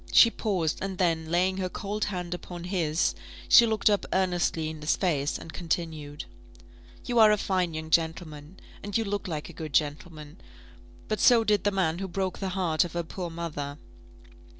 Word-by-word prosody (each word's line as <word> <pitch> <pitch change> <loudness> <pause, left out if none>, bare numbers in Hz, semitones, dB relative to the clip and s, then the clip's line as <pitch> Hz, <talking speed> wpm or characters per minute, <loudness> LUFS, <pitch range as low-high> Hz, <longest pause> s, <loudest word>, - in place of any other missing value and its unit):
She 230 - +7
paused, 185 -10 -1
and 195 -1 -4
then 165 -3 0
laying 185 +3 +1
her 185 -1 -2
cold 205 +3 -3
hand 180 -3 -4
upon 175 -1 -7
his, 175 -4 0 0.3
she 235 - +8
looked 220 -1 0
up 205 -2 +3
earnestly 175 -4 +1
in 155 -1 -7
his 150 - +1
face, 150 -6 0
and 165 - -10
continued, 160 -4 -4 0.8
"You 240 -2 +1
are 215 -1 +8
a 210 - +3
fine 185 -5 -1
young 160 0 -6
gentleman, 160 0 -1 0.2
and 205 +1 -2
you 225 - 0
look 205 -1 -3
like 155 -4 -4
a - - -11
good 155 -3 -7
gentleman; 150 +2 -2 0.7
but 215 -2 -2
so 235 +1 +6
did 210 -3 +1
the - - +5
man 180 -4 0
who 195 - -3
broke 190 0 -3
the 195 - -2
heart 165 -4 +2
of 175 - -7
her 170 0 -1
poor 175 +1 -6
mother. 150 -4 -5
175 Hz, 185 wpm, -27 LUFS, 160-195 Hz, 0.8 s, she